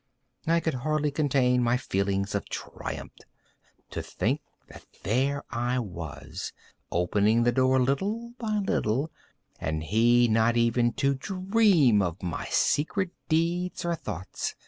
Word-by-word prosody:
I 165 +1 +4
could 160 - -1
scarcely 150 +3 0
contain 130 -4 +2
my 120 +1 +2
feelings 100 -4 -1
of 100 - -3
triumph. - - -6 0.8
To - - -3
think - - -1 0.3
that - - -13 0.2
there 135 +7 +1
I 120 +2 0
was, 80 - -6 0.4
opening 105 +7 +2
the 120 - +3
door, 130 +1 +3
little 205 - -1
by 215 -3 -1
little, 145 - 0 0.5
and 80 0 -2
he 120 +7 +4
not 115 +1 +3
even 120 0 +2
to 140 0 +1
dream 185 - +3
of 90 0 -3
my 85 -3 -3
secret 180 +5 +1 0.2
deeds 170 +3 0
or 170 - +1
thoughts. 95 - -5
125 Hz, 130 wpm, -27 LUFS, 105-160 Hz, 0.8 s, I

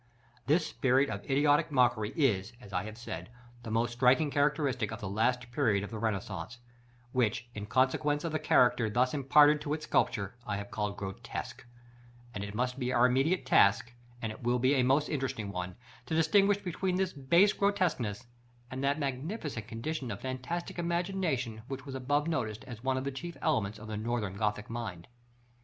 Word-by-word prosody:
This 155 +3 +3
spirit 135 -1 +2
of 100 -1 -5
idiotic 145 +3 +3
mockery 120 -5 +3
is, 115 - +1
as 105 -5 -13
I 90 +2 -1
have 110 +1 -8
said, 120 -1 -7 0.3
the 115 - -7
most 115 +2 0
striking 130 +5 +3
characteristic 145 -6 +1
of 115 - -6
the 105 - -5
last 120 +5 0
period 110 -7 +2
of 100 - -7
the 110 - -5
Renaissance, 105 -1 -3 0.5
which, 120 -1 0
in 105 -1 -6
consequence 140 +5 +1
of 165 - -2
the 155 - -1
character 120 -4 +3
thus 125 +4 +2
imparted 145 +1 +5
to 150 0 -1
its 155 -1 -7
sculpture, 100 -7 +1
I 105 -3 -3
have 100 0 -7
called 105 -2 -2
grotesque; 115 +5 -6 0.7
but 100 - -4
it 105 +1 -6
must 125 +3 -1
be 125 -1 -1
our 125 0 +4
immediate 135 +9 +2
task, 115 +4 +4 0.3
and 110 - -1
it 110 - -10
will 120 +1 +1
be 130 +3 +3
a 135 - +3
most 135 +4 +3
interesting 130 -8 -3
one, 90 -1 -4 0.3
to 160 - -1
distinguish 195 +5 +4
between 185 -1 -2
this 190 0 0
base 170 +9 +4
grotesqueness, 170 - 0 0.5
and 130 +1 -4
that 140 +1 +2
magnificent 140 - -4
condition 130 +3 -4
of 100 - -5
fantastic 130 +8 -4
imagination, 170 - -1
which 135 +1 -6
was 135 - -7
above 145 +4 0
noticed 115 -9 -2
as 120 -2 -10
one 130 0 +1
of 130 - -2
the 140 - -2
chief 170 +6 -7
elements 110 - 0
of 110 - -10
the 110 -1 -4
Northern 110 -3 -2
Gothic 105 +1 -1
mind. 110 -8 -6
125 Hz, 185 wpm, -31 LUFS, 110-150 Hz, 0.7 s, imparted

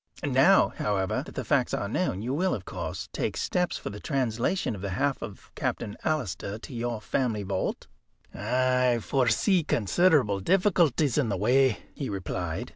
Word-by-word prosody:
"Now, - - +5
however, 95 -3 -1
that - - -11
the - - -2
facts - - +2
are - - -2
known, 95 +3 -1
you 125 +3 -2
will, 180 +5 +1
of 100 - -8
course, - - -5
take - - -2
steps 180 -1 0
for - - -6
the 105 - -8
translation 130 - -1
of 100 - -7
the 100 - -3
half 140 0 0
of 100 -3 -9
Captain 100 - -3
Alister 110 - -2
to 120 - -10
your 120 -1 -2
family 110 -2 -1
vault." 95 -1 -2 0.5
"I 125 +2 +2
foresee 135 - +2
considerable 125 - +2
difficulties 165 - +2
in 130 -6 +1
the 100 - -1
way," 125 +4 +3
he 140 - -4
replied. 95 +2 -4
120 Hz, 165 wpm, -27 LUFS, 105-145 Hz, 0.5 s, Now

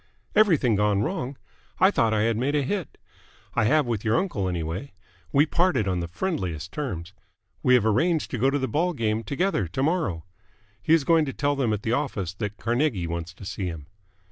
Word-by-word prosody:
"Everything 170 - +4
gone 105 0 +2
wrong? 140 - -3 0.4
I 190 +2 +6
thought 115 - +2
I 105 -1 +2
had 115 0 +2
made 135 +6 0
a 145 - +2
hit. 185 +3 -3 0.6
I - - +2
have 150 +5 +3
with 115 -4 -2
your 110 0 +2
uncle, 135 - -1
anyway. 85 - -4 0.4
We 145 +2 +5
parted 170 - +1
on 90 -2 0
the 85 - -3
friendliest 85 - -3
terms. 95 - -5 0.5
We 125 - +5
have 115 -4 +3
arranged 160 +9 +1
to 125 - -2
go 135 +4 +4
to 140 - +1
the 130 -1 -1
ball 170 +9 0
game 110 -5 0
together 140 - 0
to 95 +11 -2
morrow. 110 - 0 0.6
He 160 -1 +4
is 160 - +1
going 165 +1 +4
to 135 - -4
tell 145 0 0
them 130 -5 0
at 105 -1 -2
the 115 - 0
office 110 - -2
that 105 +1 -5
Carnegie 120 - 0
wants 85 0 -4
to 100 - -11
see 95 0 -3
him." 80 -4 -6
115 Hz, 205 wpm, -25 LUFS, 100-150 Hz, 0.6 s, I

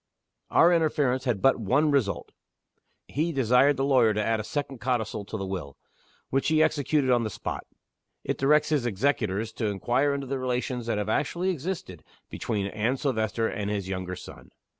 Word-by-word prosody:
Our 175 +2 +5
interference 145 -6 +1
had 115 -7 -1
but 135 -2 +4
one 140 +8 +2
result. 130 -8 0 0.8
He 160 +4 -1
desired 135 +1 +3
the 135 - 0
lawyer 125 -6 +4
to 105 - 0
add 115 -1 +1
a - - -3
second 135 +1 -4
codicil 110 -3 -2
to 110 - -5
the 95 - -4
Will 90 -8 -5 0.5
which 135 +1 +1
he 155 0 +4
executed 145 -3 +1
on 120 -1 +3
the 110 - -2
spot. - - -5 0.6
It - - -2
directs 150 +3 +3
his 145 -6 +1
executors 110 -2 0
to 110 -1 -2
inquire 125 +8 +1
into 140 -1 -4
the 135 0 -3
relations 125 -1 -2
that 115 - 0
have 105 0 -2
actually 170 +10 0
existed 160 - -5 0.3
between 105 -4 -2
Anne 110 +6 -1
Silvester 115 -4 0
and 105 -1 -3
his 100 -3 -2
younger 95 -1 -3
son. - - -12
125 Hz, 180 wpm, -27 LUFS, 105-140 Hz, 0.8 s, Our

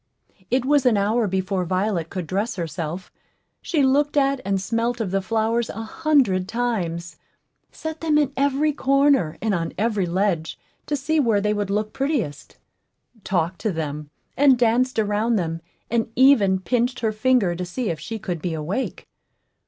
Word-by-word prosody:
It 255 +1 +1
was 285 -2 +3
an 225 -4 +4
hour 215 +3 +1
before 190 0 -1
Violet 185 -1 -1
could 185 -3 -4
dress 200 +7 -2
herself. 170 0 -5 0.5
She 310 -6 0
looked 290 +3 +2
at 275 -1 +2
and 195 -1 0
smelt 230 +4 -1
of 210 -5 -2
the 195 0 +1
flowers 225 +3 0
a 225 - -5
hundred 230 - +1
times 185 -8 -2 0.5
set 315 0 -6
them 310 -2 +2
in 285 -2 +1
every 285 +2 +1
corner 275 - +2
and 220 -2 +1
on 165 -2 -2
every 210 -3 0
ledge 175 -2 -1 0.3
to 295 - 0
see 300 +3 0
where 230 -7 +3
they 210 +1 +1
would 205 -2 -2
look 210 +1 -1
prettiest 265 - -3 0.7
talked 175 -1 -1
to 215 - 0
them, 150 -3 -4 0.3
and 275 -2 +5
danced 245 +2 +2
around 215 +2 +1
them, 165 -4 -2 0.3
and 230 -1 0
even 235 -8 +5
pinched 245 +5 -1
her 220 -2 +1
finger 215 -5 +2
to 180 - -4
see 185 +4 -3
if 160 - -5
she 225 +8 -5
could 180 -6 -4
be 170 -2 -2
awake. 175 +12 -4
215 Hz, 170 wpm, -23 LUFS, 185-255 Hz, 0.7 s, and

